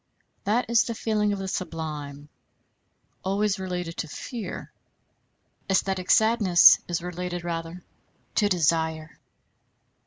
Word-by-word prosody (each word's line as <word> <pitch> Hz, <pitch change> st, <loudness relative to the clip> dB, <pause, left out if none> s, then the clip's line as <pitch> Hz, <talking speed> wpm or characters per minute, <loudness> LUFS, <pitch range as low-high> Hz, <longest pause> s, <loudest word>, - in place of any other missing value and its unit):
That 225 Hz, +5 st, +1 dB
is 235 Hz, 0 st, +3 dB
the 230 Hz, -, -4 dB
feeling 210 Hz, -2 st, 0 dB
of 200 Hz, -, -2 dB
the 195 Hz, 0 st, -5 dB
sublime, 150 Hz, -6 st, -5 dB, 1.0 s
always 200 Hz, +1 st, 0 dB
related 180 Hz, -3 st, -4 dB
to -, -, -3 dB
fear. 220 Hz, -, -7 dB, 1.0 s
Æsthetic 190 Hz, -1 st, 0 dB
sadness 220 Hz, -6 st, +6 dB
is 175 Hz, -1 st, -2 dB
related 180 Hz, 0 st, -5 dB
rather 170 Hz, +1 st, -5 dB, 0.5 s
to 205 Hz, -2 st, +2 dB
desire. 160 Hz, -2 st, 0 dB
180 Hz, 105 wpm, -25 LUFS, 165-205 Hz, 1.0 s, sadness